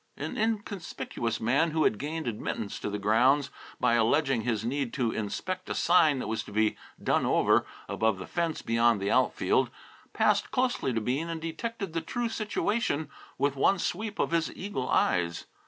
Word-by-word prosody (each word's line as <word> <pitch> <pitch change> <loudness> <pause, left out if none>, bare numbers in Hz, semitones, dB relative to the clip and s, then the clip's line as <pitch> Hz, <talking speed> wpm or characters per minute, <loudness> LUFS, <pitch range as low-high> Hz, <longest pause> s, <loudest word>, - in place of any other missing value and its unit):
An - - -4
inconspicuous 205 - -2
man 135 +9 +2
who 160 0 +1
had 105 - +2
gained 155 +2 -3
admittance 110 -2 -3
to - - -3
the 105 - -2
grounds, 125 +7 +3 0.3
by 125 -2 +3
alleging 120 +2 +2
his 115 -2 -1
need 135 0 -2
to 120 -4 0
inspect 185 - -4
a - - -2
sign 160 -5 +4
that - - -4
was 110 0 -1
to - - -11
be 110 +1 +2 0.3
"done - - +2
over," - - +3 0.2
above 110 -3 +1
the 95 - -7
fence 170 -2 -2
beyond 115 -1 +3
the 100 +2 -1
outfield, 130 0 +2 0.4
passed - - +2
closely 250 - 0
to 115 -2 -1
Bean 135 +9 -1
and 165 -1 -3
detected 190 +3 -4
the 165 - -1
true 235 +8 -2
situation 210 - -1 0.3
with 140 +1 +1
one 195 +8 +3
sweep 205 +4 -3
of - - 0
his 165 -1 +1
eagle 185 -10 -4
eyes. 85 -2 +1
140 Hz, 175 wpm, -29 LUFS, 115-170 Hz, 0.4 s, sign